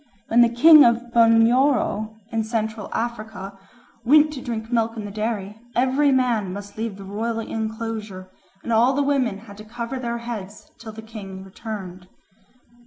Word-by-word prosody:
When 235 +2 +5
the 235 - +6
king 300 +6 +8
of 235 0 +1
Bunyoro 230 -1 +3
in 225 -1 0
Central 220 -1 -3
Africa 215 -4 -5 0.4
went 300 +4 +5
to 265 - -7
drink 225 -1 -5
milk 230 -1 0
in 215 - -5
the 205 - -7
dairy, 210 -1 -4 0.2
every 265 +3 +2
man 240 -7 +1
must 200 +1 -8
leave 220 -2 -4
the 200 - -10
royal 220 +4 -3
enclosure 220 -3 -5 0.4
and 235 - -2
all 240 +4 +4
the 285 +1 +1
women 265 -7 0
had 200 -3 -13
to 215 - -10
cover 235 +4 -6
their 235 -1 -3
heads 220 -4 -8
till 225 -1 -9
the 220 +1 -10
king 195 -4 -9
returned. 190 -2 -8
225 Hz, 165 wpm, -22 LUFS, 210-240 Hz, 0.4 s, king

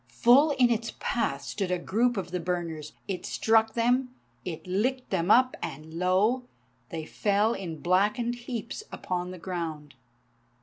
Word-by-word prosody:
Full 240 - +5
in 245 -2 +5
its 230 0 -1
path 140 -12 -1
stood 195 -3 -3
a 180 - +1
group 230 +7 +1
of 180 -2 -4
the 180 - -1
burners. 165 -3 -3
It 190 -3 -3
struck 220 0 +2
them, 245 +2 +2 0.3
it 165 -3 -6
licked 245 +8 -1
them 180 -1 0
up, 255 +3 +5
and 155 +3 -6
lo! 195 +9 +2 0.4
they 160 -2 -5
fell 205 +5 +1
in 170 -7 -6
blackened 210 +7 +2
heaps 240 - -5
upon 180 -1 -3
the 185 - -7
ground. 165 -5 -5
195 Hz, 155 wpm, -28 LUFS, 175-235 Hz, 0.4 s, Full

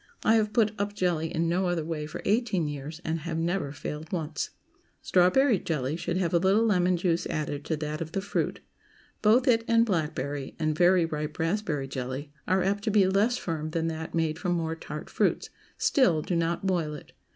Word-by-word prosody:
I 220 - +4
have 215 -2 +2
put 215 -2 +3
up 205 0 -2
jelly 170 -4 0
in 165 0 0
no 180 +2 +1
other 170 -3 -1
way 155 -2 -3
for 155 - -7
eighteen 205 -6 +1
years, 150 +3 -6
and 160 +1 -1
have 160 +1 -4
never 165 -3 -1
failed 150 +2 -6
once. 155 -4 -2 0.5
Strawberry 195 +6 +4
jelly 150 -4 -2
should 170 +1 -2
have 180 -3 0
a 170 - +5
little 195 +5 +3
lemon 180 -4 +3
juice 170 -1 0
added 145 -1 -3
to 160 - -1
that 150 0 -4
of 160 0 -5
the - - 0
fruit. 200 - -2 0.6
Both 235 +5 +4
it 230 -2 +4
and 230 0 +4
blackberry, 150 - -2
and 155 -1 0
very 175 +1 +4
ripe 150 -1 -4
raspberry 165 -5 -1
jelly, 130 +2 -5 0.2
are 185 0 +2
apt 200 +2 0
to - - +2
be 205 -2 +4
less 205 +6 +2
firm 155 -3 -3
than 165 +1 -1
that 160 +1 -5
made 160 -1 0
from 180 -2 0
more 165 -1 -1
tart 150 -2 -7
fruits; - - 0 0.3
still, 175 - +3
do 180 - -1
not 170 +2 0
boil 170 -5 0
it. 150 - -12
170 Hz, 200 wpm, -28 LUFS, 155-195 Hz, 0.6 s, a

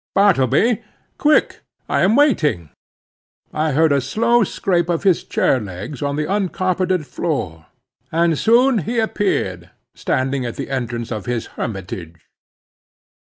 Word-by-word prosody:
"Bartleby! 200 - +3 0.4
quick, 300 0 +2 0.3
I - - +1
am 200 +4 +4
waiting." 150 - +2 0.8
I 155 -1 0
heard 160 +2 +3
a 140 -1 +3
slow 230 - +2
scrape 175 -3 -1
of 170 0 -1
his 190 -4 +3
chair 130 - +1
legs 100 +7 -7
on 140 -1 -1
the 150 +1 -1
uncarpeted 185 -2 0
floor, 85 - -4 0.4
and 165 0 +2
soon 235 - +3
he 235 +8 -3
appeared 95 - -1 0.2
standing 130 0 -1
at 120 -2 -4
the - - -6
entrance 120 -3 -3
of 110 -1 -5
his 120 -2 -2
hermitage. 90 -5 -6
155 Hz, 130 wpm, -19 LUFS, 120-195 Hz, 0.8 s, am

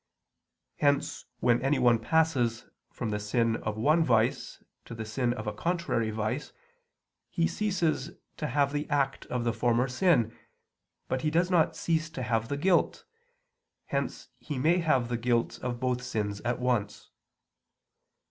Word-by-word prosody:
Hence 145 -1 +1 0.2
when 120 -1 +3
anyone 125 -4 +3
passes 125 -4 +1 0.2
from 115 -3 -4
the 105 - -1
sin 115 +2 +1
of 110 0 -4
one 155 +9 +3
vice 115 -4 +1 0.2
to 115 - -8
the 110 -1 -5
sin 120 +3 0
of 120 -2 -4
a 105 - -2
contrary 170 -5 -1
vice, 110 +6 -3 0.8
he 165 - +1
ceases 175 -8 0 0.3
to 150 - -2
have 140 +1 +1
the 145 0 -2
act 140 -2 0
of 125 -1 -2
the 120 -1 0
former 120 +2 +2
sin, 130 - +2 0.7
but 130 - -1
he 155 - +1
does 175 +4 +1
not 170 -3 +3
cease 165 -1 0
to 140 -5 -5
have 115 -1 0
the 140 - -2
guilt, 180 +4 +2 0.8
hence - - -3
he 145 - -5
may 160 +7 +3
have 135 -8 +2
the 120 0 -1
guilt 120 0 0
of 120 -1 -4
both 125 -1 0
sins 105 -5 -3
at 120 0 -1
once. 120 -5 -1
125 Hz, 155 wpm, -29 LUFS, 115-150 Hz, 0.8 s, when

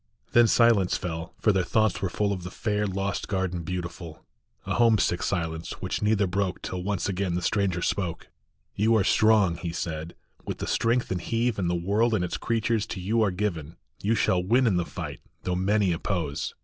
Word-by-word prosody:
Then 120 -1 +6
silence 115 -6 +4
fell, 80 -1 -5
for 110 - +3
their 95 -2 +1
thoughts 110 +1 +1
were 95 - 0
full 100 +2 0
Of 95 - -5
the 90 - -6
fair 105 +1 -1
lost 95 +1 -2
garden 95 -3 -1
beautiful; 85 -1 -6 0.4
A - - -1
homesick 110 -7 +3
silence, 80 -3 -2
which 95 0 -4
neither 105 -1 +2
broke 95 0 -2
Till 90 - -4
once 100 +1 -1
again 95 -2 -1
the 90 - -1
stranger 95 -3 0
spoke: 90 -5 -2 0.5
"You 110 +3 +2
are 105 - +4
strong," 105 -5 +4
he 85 - -4
said, 80 -1 -4 0.3
"with - - -4
the - - -4
strength 120 +2 +1
of 95 - 0
heave 115 +3 -1
And 90 -3 0
the 90 - +1
world 105 +7 +1
and 90 -4 0
its - - -3
creatures 115 -1 0
to 95 - -5
you 110 +6 +1
are 105 - +3
given; 90 -5 -3 0.3
You 110 +3 +2
shall 90 -4 +2
win 120 +7 +3
in 100 -6 +3
the 90 - 0
fight, - - -7 0.2
though 90 - -1
many 95 +1 +2
oppose. 85 -3 -2
95 Hz, 200 wpm, -26 LUFS, 90-110 Hz, 0.5 s, Then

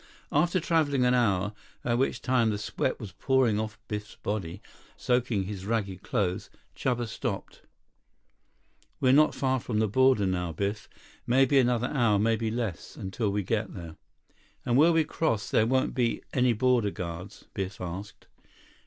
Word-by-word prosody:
After 175 +5 +2
traveling 150 -6 +2
an 125 - +4
hour, 105 -4 +2 0.3
by 120 - 0
which 130 +3 0
time 125 -3 +2
the 105 - -1
sweat 105 - -2
was 105 - -7
pouring 125 0 +2
off 110 0 -4
Biff's 105 -1 -5
body, 95 -4 -4 0.4
soaking 125 -5 +1
his 95 0 -6
ragged 100 -5 -1
clothes, 100 -7 -1 0.3
Chuba 120 -2 -1
stopped. 110 - -5 1.4
"We're 130 0 +4
not 155 +2 +5
far 130 -2 +1
from 115 -2 -3
border 130 -4 +4
now, 90 -3 -1
Biff. 100 +5 -3 0.4
Maybe 135 +2 +4
another 125 -1 +2
hour, 115 -7 +3
maybe 110 +1 +1
less, 110 -5 -4
until 100 +3 -2
we 100 0 -1
get 105 +1 -2
there." 85 -4 -8 0.7
"And 120 - +1
where 155 +6 +6
we 165 -1 +3
cross 150 -8 -1
there 110 - +3
won't 130 +1 +1
be 120 -2 0
any 125 -2 +3
border 120 -2 +2
guards?" 90 0 -7
Biff 95 0 -4
asked. 90 +3 -7
115 Hz, 155 wpm, -28 LUFS, 100-130 Hz, 1.4 s, where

